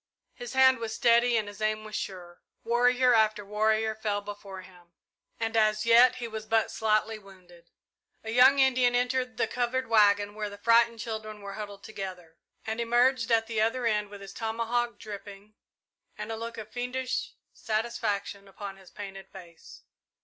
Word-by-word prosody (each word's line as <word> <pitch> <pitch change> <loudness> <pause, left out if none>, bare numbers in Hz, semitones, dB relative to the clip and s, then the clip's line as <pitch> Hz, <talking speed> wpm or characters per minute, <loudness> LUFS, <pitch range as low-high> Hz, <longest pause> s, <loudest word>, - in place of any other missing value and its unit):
His 245 0 -8
hand 260 -1 +5
was 225 -1 -4
steady 235 -1 +4
and 215 -2 -1
his 205 0 -10
aim 215 0 0
was 215 -1 -8
sure. 175 -2 -6 0.2
Warrior 245 +1 +3
after 215 -2 +2
warrior 220 +1 +1
fell 215 -2 -2
before 200 -2 -9
him, 175 -2 -19 0.5
and 225 0 -2
as 215 0 +2
yet 235 +2 +6
he 245 -2 -5
was 220 -1 -7
but 225 -1 +1
slightly 220 0 0
wounded. 180 -4 -18 0.5
A 220 - -5
young 255 +4 +6
Indian 255 -2 +3
entered 250 -1 0
the - - +2
covered 250 +2 -1
waggon 205 -2 +3
where 210 0 -4
the 205 - -10
frightened 230 +2 +3
children 215 -1 -6
were 200 0 -7
huddled 205 -1 -8
together, 185 -6 -8 0.3
and 220 +1 -3
emerged 240 +1 +2
at 225 -1 +3
the 225 -1 -2
other 235 +3 0
end 210 -2 0
with 205 -1 -11
his 195 0 -10
tomahawk 230 +2 -2
dripping 205 0 -10 0.6
and - - -6
a - - -3
look 230 +1 -7
of 215 -1 -8
fiendish 250 +1 -3 0.2
satisfaction 205 -3 -3
upon 195 0 -8
his 190 -2 -17
painted 195 -1 -9
face. 175 -4 -14
220 Hz, 170 wpm, -28 LUFS, 205-235 Hz, 0.6 s, yet